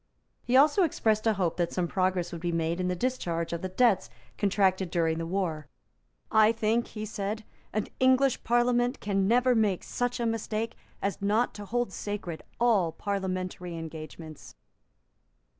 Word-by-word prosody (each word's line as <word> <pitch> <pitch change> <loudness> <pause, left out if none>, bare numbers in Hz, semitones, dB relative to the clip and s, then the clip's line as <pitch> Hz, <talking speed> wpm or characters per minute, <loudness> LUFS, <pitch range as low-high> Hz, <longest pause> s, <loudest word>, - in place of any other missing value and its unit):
He 245 +2 +2
also 295 +7 +5
expressed 225 - +1
a 220 - +4
hope 180 -5 -1
that 175 -1 0
some 180 -2 -1
progress 185 -1 0
would 170 - -6
be 175 0 -1
made 165 +1 -1
in 180 - 0
the 180 - 0
discharge 175 -8 -2
of 170 - -3
the 185 - -3
debts 200 -1 +3 0.3
contracted 190 -2 +2
during 165 -2 +1
the 165 - -3
War. 165 -5 -2 0.6
"I 220 0 +6
think," 225 +1 0
he 215 -1 -6
said, 210 +1 -4 0.3
"an 215 - -1
English 260 0 +3
Parliament 245 +1 +2
can 195 -1 0
never 250 +3 +4
make 210 -5 +1
such 245 0 -2
a 235 - 0
mistake 225 0 -2 0.3
as 200 +1 -2
not 215 +4 +1
to 205 - -8
hold 240 -1 -1
sacred 195 -6 -5 0.2
all 215 -9 +3
Parliamentary 185 -2 -3
engagements." 160 -1 -9
200 Hz, 160 wpm, -28 LUFS, 175-230 Hz, 0.6 s, I